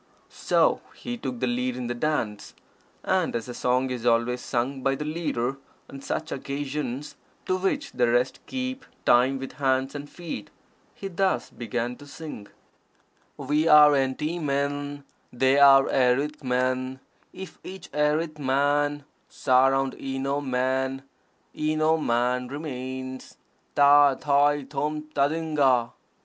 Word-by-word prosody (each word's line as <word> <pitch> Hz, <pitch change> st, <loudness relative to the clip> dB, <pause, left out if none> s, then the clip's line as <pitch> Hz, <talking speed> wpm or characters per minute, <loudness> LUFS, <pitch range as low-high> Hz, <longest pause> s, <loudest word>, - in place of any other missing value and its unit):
So -, -, +1 dB
he 245 Hz, 0 st, -5 dB
took 130 Hz, -, -5 dB
the -, -, +2 dB
lead 125 Hz, 0 st, -1 dB
in 125 Hz, -, -4 dB
the 120 Hz, -, -2 dB
dance, 120 Hz, -6 st, -2 dB, 0.5 s
and, 185 Hz, -7 st, 0 dB
as 115 Hz, 0 st, -3 dB
a 125 Hz, -, -6 dB
song 125 Hz, +2 st, 0 dB
is 125 Hz, -2 st, -4 dB
always 120 Hz, +1 st, +2 dB
sung 130 Hz, +3 st, -2 dB
by 135 Hz, +1 st, +1 dB
the 150 Hz, -, -5 dB
leader 135 Hz, -5 st, -2 dB, 0.3 s
on 135 Hz, -, -9 dB
such 155 Hz, +3 st, -4 dB
occasions, 140 Hz, 0 st, -4 dB, 0.3 s
to 185 Hz, -, +1 dB
which 195 Hz, +10 st, -1 dB
the 120 Hz, -1 st, +1 dB
rest 125 Hz, +2 st, +1 dB
keep 260 Hz, 0 st, -4 dB, 0.2 s
time 130 Hz, +3 st, +4 dB
with 135 Hz, 0 st, -6 dB
hands 130 Hz, 0 st, +1 dB
and 145 Hz, 0 st, -7 dB
feet, 165 Hz, -12 st, -7 dB, 0.5 s
he 195 Hz, -, -6 dB
thus 190 Hz, +1 st, -1 dB
began 120 Hz, +1 st, -4 dB
to 145 Hz, -, -13 dB
sing: 145 Hz, -9 st, -9 dB, 0.9 s
"We 150 Hz, +3 st, 0 dB
are 150 Hz, -1 st, +8 dB
enty 145 Hz, +5 st, 0 dB
men, 145 Hz, 0 st, -2 dB, 0.3 s
They 130 Hz, +3 st, +3 dB
are 135 Hz, -1 st, +7 dB
erith 135 Hz, +4 st, +1 dB
men: 130 Hz, +1 st, -1 dB, 0.3 s
If 190 Hz, -3 st, -10 dB
each 190 Hz, -1 st, -9 dB
erith 155 Hz, +1 st, 0 dB
man, 145 Hz, +2 st, +1 dB, 0.3 s
Surround 135 Hz, 0 st, +2 dB
eno 135 Hz, +1 st, -2 dB
men 130 Hz, 0 st, -1 dB, 0.5 s
Eno 155 Hz, +1 st, +1 dB
man 125 Hz, -2 st, 0 dB
remains. 130 Hz, -2 st, -6 dB, 0.4 s
_Tâ, 145 Hz, -1 st, +6 dB
tai, 145 Hz, 0 st, +3 dB
tôm, 150 Hz, +2 st, -3 dB
tadingana. 140 Hz, -5 st, +2 dB
135 Hz, 135 wpm, -26 LUFS, 130-150 Hz, 0.9 s, are